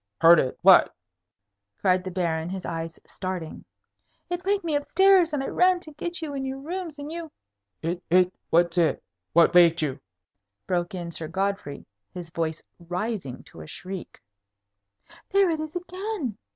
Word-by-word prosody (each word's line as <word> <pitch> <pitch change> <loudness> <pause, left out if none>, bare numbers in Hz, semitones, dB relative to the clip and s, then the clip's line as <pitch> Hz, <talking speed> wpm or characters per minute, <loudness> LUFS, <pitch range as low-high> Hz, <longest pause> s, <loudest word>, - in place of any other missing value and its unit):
"Heard 165 0 +8
it? 130 - -1
What?" - - +7 0.8
cried 185 -1 +2
the 185 - -4
Baron, 170 -2 -1
his 190 0 -5
eyes 165 -1 -5
starting. 185 -4 -6 0.7
"It 355 0 -2
waked 400 0 +1
me 320 -3 -1
up 290 - 0
stairs, 380 -1 +5
and 290 -3 -1
I - - -3
ran 365 0 +3
to 315 - -9
get 340 +3 -5
you 295 -2 -4
in 270 -1 -3
your 265 0 -4
room, 345 +6 -5
and 290 +1 -7
you 330 -2 -6 0.3
" 100 0 -56
"It 170 +2 -2
it? 180 +1 +4 0.2
What's 170 +1 +3
it? 165 - +1 0.3
What 170 0 +5
waked 170 -2 +6
you?" 140 -1 -2 0.7
broke 175 0 -1
in 170 -2 -5
Sir 160 -1 -5
Godfrey, 190 -4 -3 0.3
his 175 -2 -7
voice 160 -1 -3 0.2
rising 175 - -4
to 80 - -13
a 80 - -10
shriek. 185 - -8 1.1
"There 390 -2 +4
it 320 - -1
is 310 +2 -5
again!" 360 - -4
185 Hz, 170 wpm, -26 LUFS, -, 1.1 s, Heard